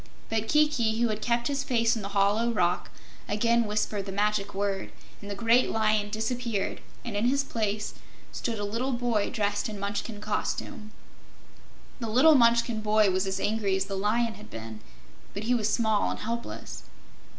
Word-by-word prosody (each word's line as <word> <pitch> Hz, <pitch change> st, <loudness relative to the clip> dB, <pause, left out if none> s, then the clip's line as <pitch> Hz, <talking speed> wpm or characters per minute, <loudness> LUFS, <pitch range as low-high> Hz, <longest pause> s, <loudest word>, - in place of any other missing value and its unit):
But 225 Hz, 0 st, -1 dB
Kiki, 285 Hz, -6 st, +2 dB
who 240 Hz, -1 st, +2 dB
had 215 Hz, 0 st, -3 dB
kept 235 Hz, +1 st, +1 dB
his 280 Hz, -1 st, -1 dB
face 230 Hz, -4 st, +2 dB
in 225 Hz, -, -4 dB
the 200 Hz, -, -4 dB
hollow 210 Hz, +4 st, +3 dB
rock, 180 Hz, -5 st, 0 dB, 0.4 s
again 230 Hz, +3 st, +2 dB
whispered 210 Hz, -1 st, -1 dB
the -, -, -3 dB
magic 205 Hz, 0 st, 0 dB
word, 195 Hz, -1 st, -2 dB, 0.3 s
and 205 Hz, -, -8 dB
the 200 Hz, -, -3 dB
great 230 Hz, +4 st, +3 dB
lion 215 Hz, -1 st, +1 dB
disappeared 220 Hz, -1 st, -2 dB, 0.2 s
and 230 Hz, -4 st, -4 dB
in 205 Hz, +3 st, +1 dB
his 275 Hz, +3 st, +2 dB
place 215 Hz, -4 st, -2 dB, 0.4 s
stood 230 Hz, -2 st, -3 dB
a 205 Hz, -, -2 dB
little 235 Hz, +6 st, -1 dB
boy 235 Hz, -4 st, 0 dB
dressed 205 Hz, 0 st, -1 dB
in 210 Hz, -2 st, -6 dB
Munchkin 205 Hz, +2 st, -3 dB
costume. 215 Hz, +2 st, -3 dB, 1.1 s
The 230 Hz, -2 st, -3 dB
little 265 Hz, +8 st, +6 dB
Munchkin 235 Hz, -3 st, +4 dB
boy 215 Hz, -1 st, +3 dB
was 190 Hz, +1 st, 0 dB
as 190 Hz, 0 st, -2 dB
angry 205 Hz, -2 st, 0 dB
as 190 Hz, 0 st, 0 dB
the 195 Hz, -, -4 dB
lion 220 Hz, +4 st, +1 dB
had 105 Hz, -, -13 dB
been, 110 Hz, -1 st, -8 dB, 0.6 s
but 200 Hz, -, -4 dB
he 240 Hz, +3 st, +1 dB
was 220 Hz, -3 st, +1 dB
small 220 Hz, -2 st, +2 dB
and -, -, -3 dB
helpless. 235 Hz, +2 st, -5 dB
215 Hz, 175 wpm, -28 LUFS, 205-235 Hz, 1.1 s, little